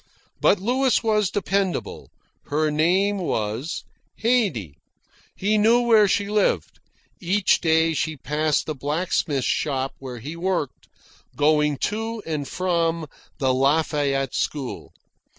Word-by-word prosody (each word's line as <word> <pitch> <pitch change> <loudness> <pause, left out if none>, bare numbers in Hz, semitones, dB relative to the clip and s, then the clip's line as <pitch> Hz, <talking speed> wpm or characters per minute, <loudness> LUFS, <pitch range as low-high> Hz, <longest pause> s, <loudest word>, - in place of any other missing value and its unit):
But - - +4
Louis 250 +5 +1
was 210 -3 +2
dependable. 195 -2 -2 0.4
Her 155 +1 0
name 185 +7 +2
was 115 - -3 0.3
Haydee. 200 - 0 0.6
He 210 +2 +1
knew 230 +3 +4
where 225 -3 +5
she 200 +1 0
lived. 210 0 0 0.4
Each 190 +2 +2
day 160 0 +3
she 155 0 -2
passed 150 +2 0
the 155 - -3
blacksmith's 150 -1 -1
shop 135 -2 -1
where 130 -2 -7
he 145 +8 -7
worked, 170 -5 -3 0.5
going 150 -1 +2 0.2
to 225 0 -4
or 155 -3 -3
from 170 -1 -1 0.3
the 130 -2 +1
Lafayette 140 -1 +1
School. 140 -4 -3
165 Hz, 115 wpm, -23 LUFS, 145-200 Hz, 0.6 s, where